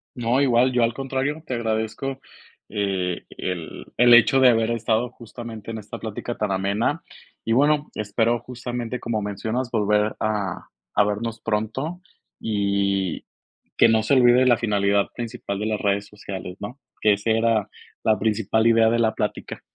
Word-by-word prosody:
No, 120 +1 +1
igual. 130 -1 +4
Yo, 125 -1 +1
al 115 0 +1
contrario, 135 +4 -3
te 125 - -3
agradezco, 115 +4 -2 0.5
eh, 95 -4 -2
el 90 -3 -5
el 120 0 +7
hecho 120 +3 +6
de 130 - +7
haber 115 -1 +3
estado 115 +1 0
justamente 115 -2 -9
en 115 - -5
esta 105 -1 -8
plática 110 +2 -5
tan 105 -2 -1
amena. 100 - 0 0.4
Y 115 - -2
bueno, 145 +4 +3
espero, 110 +3 0
justamente 120 0 -5
como 115 -2 -2
mencionas, 110 +5 -3
volver 105 -1 +1
a 105 -4 -2 0.3
a - - +7
vernos 110 +2 -3
pronto, 115 +11 -2 0.4
y 100 -3 0 0.5
que - - +6
no 110 0 +4
se 110 - +1
olvide 125 -1 +6
la 125 -2 +5
finalidad 100 -3 +1
principal 110 -4 -5
de 105 - -2
las 110 -1 -1
redes 100 0 +1
sociales, 95 -3 -7
¿no? 120 +7 -7 0.2
Que 105 - +5
ese 110 +3 0
era 115 -2 +1 0.3
la 110 -1 +3
principal 110 +1 +1
idea 115 -1 +5
de 115 +1 +1
la 110 -1 +2
plática. - - -4
110 Hz, 160 wpm, -23 LUFS, 105-120 Hz, 0.5 s, el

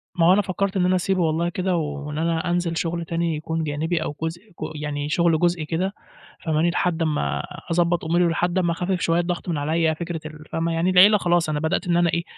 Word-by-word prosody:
ما 170 - +3
هو 180 - +7
أنا 205 - +4
فكرت 195 0 -2
إن 180 - +2
أنا 185 - +3
أسيبه 185 0 0
والله 165 +1 +1
كده، 185 0 -1
وإن 150 -2 -3
أنا 165 0 0
أنزل 175 -1 0
شغل 170 0 -2
تاني 165 -1 -1
يكون 160 +1 -3
جانبي 155 +3 -1
أو 145 - -4
جزء 165 +2 -3
ج 190 - -23 0.3
يعني 145 0 -3
شغل 165 -1 +2
جزئي 175 -2 +1
كده، 180 +5 -2 0.5
فاهماني، 160 +1 +2
لحد 175 -1 0
أمّا 155 -2 0 0.3
أضبط 170 0 +1
أموري 175 +2 +2
ولحد 175 +2 0
أمّا 175 -2 +2
أخفّف 180 +2 -1
شويّة 165 +1 +2
الضغط 175 +1 -2
من 165 - -1
عليّا، 160 +2 +1
فكرة 170 +1 -5
ال 155 0 -9
فاهمة، 165 +1 -1
يعني 165 +3 +1
العيلة 190 +3 +7
خلاص 175 -3 +1
أنا 150 -1 -1
بدأت 170 +4 -1
إن 175 - +2
أنا 175 -1 +3
إيه، 170 +1 0
170 Hz, 225 wpm, -23 LUFS, 160-175 Hz, 0.5 s, هو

